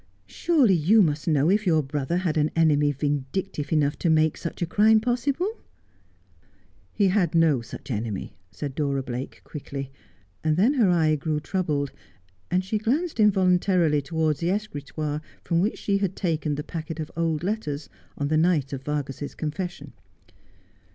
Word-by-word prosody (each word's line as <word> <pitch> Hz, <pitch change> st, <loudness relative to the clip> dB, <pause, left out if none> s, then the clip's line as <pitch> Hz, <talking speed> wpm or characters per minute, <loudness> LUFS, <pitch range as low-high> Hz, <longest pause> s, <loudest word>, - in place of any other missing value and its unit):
Surely 285 Hz, -, +2 dB
you 190 Hz, +6 st, +5 dB
must 150 Hz, -1 st, -1 dB
know 150 Hz, -2 st, +3 dB
if 210 Hz, 0 st, +1 dB
your 160 Hz, -3 st, +3 dB
brother 145 Hz, +4 st, -2 dB
had 180 Hz, -4 st, -1 dB
an 155 Hz, -1 st, +2 dB
enemy 150 Hz, -3 st, +3 dB
vindictive 145 Hz, +3 st, -3 dB
enough, 150 Hz, -2 st, +1 dB
to 170 Hz, -, +1 dB
make 155 Hz, -1 st, +3 dB
such 165 Hz, -, -6 dB
a -, -, +2 dB
crime 215 Hz, +5 st, +4 dB
possible 250 Hz, +8 st, 0 dB
1 435 Hz, +3 st, -3 dB, 0.5 s
' -, -, -36 dB
' -, -, -35 dB
He 200 Hz, -, +3 dB
had 180 Hz, -4 st, +1 dB
no 160 Hz, -6 st, +4 dB
such 130 Hz, +4 st, -9 dB
enemy,' 110 Hz, -3 st, -3 dB, 0.2 s
said 135 Hz, +10 st, -6 dB
Dora 140 Hz, -2 st, -1 dB
Blake 125 Hz, +1 st, -6 dB
quickly, 140 Hz, -2 st, -7 dB, 0.5 s
and 155 Hz, 0 st, +1 dB
then 225 Hz, +10 st, +4 dB
her 235 Hz, -9 st, +3 dB
eye 160 Hz, -3 st, +3 dB
grew 150 Hz, +1 st, -1 dB
troubled, 150 Hz, -5 st, -1 dB, 0.6 s
and 185 Hz, +1 st, +1 dB
she 210 Hz, +3 st, -1 dB
glanced 280 Hz, +7 st, -1 dB
involuntarily 180 Hz, -6 st, +3 dB
towards 155 Hz, 0 st, -1 dB
the 170 Hz, -, 0 dB
escritoire 150 Hz, -6 st, -3 dB, 0.2 s
from 170 Hz, 0 st, +1 dB
which 210 Hz, +4 st, 0 dB
she 200 Hz, -1 st, 0 dB
had 195 Hz, -2 st, -1 dB
taken 155 Hz, -5 st, -1 dB
the 150 Hz, -, -4 dB
packet 160 Hz, 0 st, -6 dB
of 155 Hz, -, -5 dB
old 165 Hz, -1 st, -1 dB
letters 175 Hz, -8 st, -3 dB, 0.3 s
on 145 Hz, -, -1 dB
the 155 Hz, +1 st, +2 dB
night 155 Hz, -5 st, +2 dB
of 135 Hz, -, -4 dB
Vargas's 145 Hz, -1 st, -4 dB
confession. 175 Hz, +3 st, -5 dB
160 Hz, 170 wpm, -25 LUFS, 145-190 Hz, 0.6 s, you